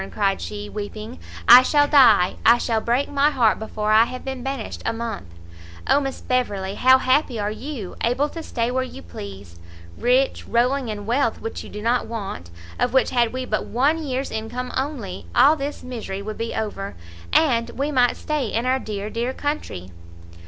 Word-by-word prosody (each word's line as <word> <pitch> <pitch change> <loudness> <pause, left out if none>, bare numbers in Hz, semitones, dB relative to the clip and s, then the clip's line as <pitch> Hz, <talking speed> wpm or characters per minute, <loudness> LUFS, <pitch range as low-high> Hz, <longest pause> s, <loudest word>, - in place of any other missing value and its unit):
cried 195 -2 0
she, 210 0 -6
weeping, 215 +3 -7 0.3
"I 245 +2 +11
shall 290 +2 +3
die, 265 -11 +5
I 235 - +7
shall 225 -2 0
break 245 +5 +1
my 285 +1 +2
heart 240 -7 +2
before 215 -1 -2
I 220 +1 +6
have 255 +1 -8
been 265 -1 -4
banished 270 -3 -5
a - - 0
month! 225 - -5 0.6
Oh - - +4
Miss 270 -2 -4
Beverley, 200 -7 -1
how 260 +5 +5
happy 260 -2 +1
are 205 0 -1
you! 240 -4 -6
able 250 +5 +1
to 330 - -7
stay 235 -6 -2
where 260 +1 0
you 255 - -7
please, 85 0 -10 0.4
rich, 255 +2 +1
rolling 250 +3 +1
in 210 -2 -5
wealth 235 +1 0
which 225 - -6
you - - -10
do 210 0 -8
not 240 +2 +1
want, 195 - -6 0.3
of 245 0 +1
which 265 -2 +3
had 240 -2 +2
we 255 0 -4
but 215 - -2
one 285 +7 +1
year's 270 -2 -3
income 230 +3 -4
only, 260 -9 -4
all 295 +3 +6
this 285 0 -5
misery 220 -6 -6
would 215 +1 -6
be 230 0 -3
over, 205 -2 -4 0.4
and 235 -7 +3
we 285 +3 -1
might 250 -3 +3
stay 300 -5 -2
in 230 +3 -2
our 260 +1 +2
dear, 210 -4 -5
dear, 240 +3 -2
country!" 290 - -4
240 Hz, 190 wpm, -22 LUFS, 215-265 Hz, 0.6 s, I